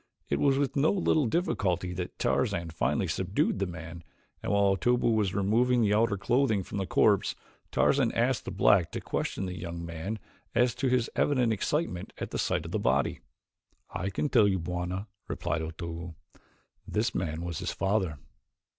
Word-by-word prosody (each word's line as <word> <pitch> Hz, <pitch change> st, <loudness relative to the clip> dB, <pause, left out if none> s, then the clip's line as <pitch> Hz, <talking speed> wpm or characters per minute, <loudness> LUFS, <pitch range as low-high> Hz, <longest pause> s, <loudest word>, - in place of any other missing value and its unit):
It 70 Hz, -, +1 dB
was 135 Hz, -1 st, +3 dB
with 140 Hz, -1 st, 0 dB
no 145 Hz, +2 st, +4 dB
little 160 Hz, -7 st, +2 dB
difficulty 95 Hz, -, 0 dB
that 90 Hz, 0 st, -5 dB
Tarzan 85 Hz, -1 st, 0 dB
finally 80 Hz, -, 0 dB
subdued 95 Hz, +1 st, 0 dB
the 100 Hz, -, 0 dB
man, 85 Hz, -1 st, -8 dB, 0.4 s
and -, -, -2 dB
while 100 Hz, -1 st, +4 dB
Otobu 120 Hz, +4 st, +2 dB
was 105 Hz, -4 st, +1 dB
removing 120 Hz, +5 st, +3 dB
the 105 Hz, -1 st, +3 dB
outer 105 Hz, -1 st, +2 dB
clothing 110 Hz, -1 st, +2 dB
from 100 Hz, -, -5 dB
the 95 Hz, -, -2 dB
corpse, -, -, +3 dB, 0.4 s
Tarzan 135 Hz, -4 st, +3 dB
asked 120 Hz, +1 st, +1 dB
the -, -, -3 dB
black 95 Hz, -2 st, +3 dB
to -, -, -2 dB
question -, -, -3 dB
the 90 Hz, -1 st, -4 dB
young 85 Hz, -1 st, -5 dB
man 85 Hz, +6 st, -4 dB, 0.4 s
as 125 Hz, -1 st, +3 dB
to 125 Hz, +2 st, -1 dB
his 125 Hz, -2 st, +2 dB
evident 125 Hz, -5 st, +2 dB
excitement 110 Hz, -, -2 dB
at -, -, -5 dB
the -, -, -3 dB
sight -, -, 0 dB
of -, -, -6 dB
the -, -, 0 dB
body. 65 Hz, +3 st, +1 dB, 0.7 s
"I 95 Hz, +3 st, -2 dB
can 100 Hz, +9 st, -1 dB
tell 115 Hz, -7 st, +5 dB
you 95 Hz, -1 st, +2 dB
Bwana," 90 Hz, +3 st, -3 dB, 0.2 s
replied 80 Hz, -, -2 dB
Otobu. 85 Hz, +1 st, -6 dB, 0.7 s
"This 110 Hz, +2 st, 0 dB
man 85 Hz, -2 st, -2 dB
was 85 Hz, -3 st, -4 dB
his -, -, -2 dB
father." 95 Hz, -6 st, 0 dB
100 Hz, 175 wpm, -29 LUFS, 85-120 Hz, 0.7 s, tell